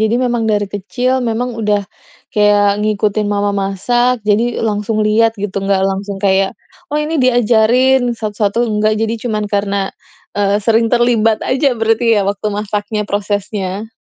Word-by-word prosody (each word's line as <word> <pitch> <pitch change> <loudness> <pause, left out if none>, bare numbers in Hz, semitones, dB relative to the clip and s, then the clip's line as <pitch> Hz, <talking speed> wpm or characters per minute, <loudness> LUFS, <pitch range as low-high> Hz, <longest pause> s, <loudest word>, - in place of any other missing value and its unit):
Jadi 220 +1 +2
memang 240 -2 0
dari 205 -1 +1
kecil, 245 +6 -2
memang 240 +1 -2
udah 205 -2 0 0.5
kayak 205 -1 +3
ngikutin 210 0 0
mamah 205 0 0
masak. 240 +6 +1
Jadi 225 +3 +1
langsung 215 0 -1
lihat 225 +1 +2
gitu. 200 -1 -4
Enggak 195 -1 +1
langsung 195 0 -3
kayak, 195 -1 +2 0.4
"Oh 300 - 0
ini 305 +2 -2
diajarin 245 +1 +3
satu-satu." 210 0 -1
Enggak, 215 0 +1
jadi 225 +1 -1
cuman 215 -3 -2
karena, 200 -1 -1 0.4
eee, 205 0 +1
sering 225 +2 +2
terlibat 235 -3 +2
aja 265 -1 +1
berarti 225 +1 +1
ya - - +2
waktu 205 +1 -2
masaknya, 210 +1 -3
prosesnya. 205 +1 -3
215 Hz, 145 wpm, -15 LUFS, 205-230 Hz, 0.5 s, kayak